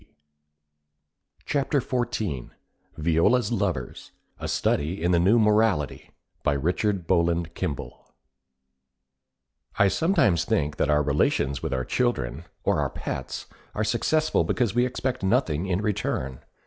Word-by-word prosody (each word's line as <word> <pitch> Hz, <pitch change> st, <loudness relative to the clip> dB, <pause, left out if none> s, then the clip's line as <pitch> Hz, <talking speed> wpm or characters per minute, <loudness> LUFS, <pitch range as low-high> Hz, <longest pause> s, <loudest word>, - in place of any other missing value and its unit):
Viola's 85 Hz, +11 st, +2 dB
Lovers 95 Hz, -, -2 dB, 0.3 s
A -, -, -4 dB
Study 80 Hz, +6 st, 0 dB
in 90 Hz, -, +2 dB
the 85 Hz, -, +4 dB
New 100 Hz, +7 st, +4 dB
Morality 105 Hz, -, +2 dB, 0.3 s
By -, -, +1 dB
Richard 90 Hz, +6 st, 0 dB
Bowland 85 Hz, -1 st, +1 dB
Kimball 85 Hz, -8 st, -5 dB, 1.7 s
I 100 Hz, -, +5 dB
sometimes 160 Hz, -, +2 dB
think 75 Hz, +1 st, 0 dB
that -, -, +1 dB
our 75 Hz, 0 st, +3 dB
relations 70 Hz, -1 st, +1 dB
with -, -, -3 dB
our 65 Hz, 0 st, -1 dB
children, 85 Hz, -, -1 dB, 0.2 s
or -, -, +2 dB
our -, -, 0 dB
pets, -, -, -5 dB, 0.3 s
are 110 Hz, -, 0 dB
successful 155 Hz, +8 st, +1 dB
because 120 Hz, -5 st, 0 dB
we 120 Hz, +1 st, +3 dB
expect 130 Hz, 0 st, -3 dB
nothing 95 Hz, -, +1 dB
in 95 Hz, +1 st, 0 dB
return. 65 Hz, -, -2 dB
90 Hz, 115 wpm, -25 LUFS, 75-110 Hz, 1.7 s, I